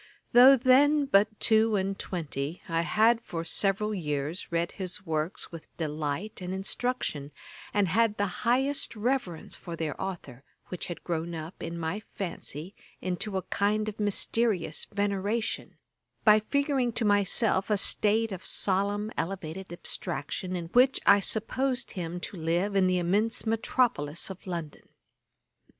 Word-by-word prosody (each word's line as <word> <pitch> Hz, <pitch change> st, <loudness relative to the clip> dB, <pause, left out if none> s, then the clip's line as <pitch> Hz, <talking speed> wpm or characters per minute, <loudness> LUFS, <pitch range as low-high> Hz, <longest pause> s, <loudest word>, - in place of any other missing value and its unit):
Though 260 Hz, +3 st, +9 dB
then 280 Hz, +4 st, +5 dB
but 215 Hz, -4 st, +3 dB
two 220 Hz, 0 st, +4 dB
and 195 Hz, 0 st, 0 dB
twenty, 155 Hz, -3 st, -4 dB
I 165 Hz, -2 st, +1 dB
had 220 Hz, +6 st, +3 dB
for 165 Hz, -6 st, -5 dB
several 195 Hz, +5 st, 0 dB
years 150 Hz, -2 st, -3 dB
read 170 Hz, 0 st, 0 dB
his 190 Hz, +1 st, -6 dB
works 155 Hz, +1 st, -2 dB
with 165 Hz, -2 st, -10 dB
delight 155 Hz, +6 st, -3 dB
and 180 Hz, +1 st, -3 dB
instruction, 190 Hz, -, -2 dB, 0.4 s
and 205 Hz, -2 st, +2 dB
had 215 Hz, +3 st, +2 dB
the 205 Hz, -, +1 dB, 0.2 s
highest 265 Hz, +3 st, +1 dB
reverence 215 Hz, -7 st, -2 dB
for 170 Hz, -2 st, -7 dB
their 160 Hz, -3 st, -2 dB
authour, 160 Hz, -9 st, -6 dB, 0.3 s
which 180 Hz, -, -4 dB
had 175 Hz, -, -7 dB
grown 170 Hz, 0 st, -3 dB
up 160 Hz, +2 st, -8 dB
in 170 Hz, -, -5 dB
my 165 Hz, +4 st, -2 dB, 0.2 s
fancy 175 Hz, -2 st, -5 dB, 0.3 s
into 190 Hz, +2 st, -2 dB
a 190 Hz, -, -2 dB
kind 210 Hz, +3 st, 0 dB
of 215 Hz, 0 st, -5 dB
mysterious 205 Hz, -4 st, 0 dB
veneration, 205 Hz, +2 st, -2 dB, 0.5 s
by 215 Hz, -1 st, +7 dB
figuring 275 Hz, +1 st, 0 dB
to 230 Hz, -, 0 dB
myself 205 Hz, 0 st, +2 dB
a 210 Hz, -, +3 dB
state 220 Hz, +3 st, +3 dB
of 185 Hz, -1 st, -6 dB
solemn 205 Hz, +2 st, +1 dB
elevated 180 Hz, +1 st, -4 dB
abstraction, 175 Hz, +1 st, -3 dB
in 175 Hz, -2 st, -3 dB
which 255 Hz, +6 st, +4 dB
I 200 Hz, -, +7 dB
supposed 245 Hz, +5 st, -1 dB
him 175 Hz, -2 st, -4 dB
to 190 Hz, -, -6 dB
live 175 Hz, +5 st, 0 dB
in 190 Hz, -1 st, +4 dB
the 185 Hz, 0 st, +2 dB
immense 205 Hz, +7 st, +1 dB
metropolis 220 Hz, -, 0 dB
of 190 Hz, 0 st, -11 dB
London. 170 Hz, -5 st, -6 dB
195 Hz, 145 wpm, -28 LUFS, 170-220 Hz, 0.5 s, Though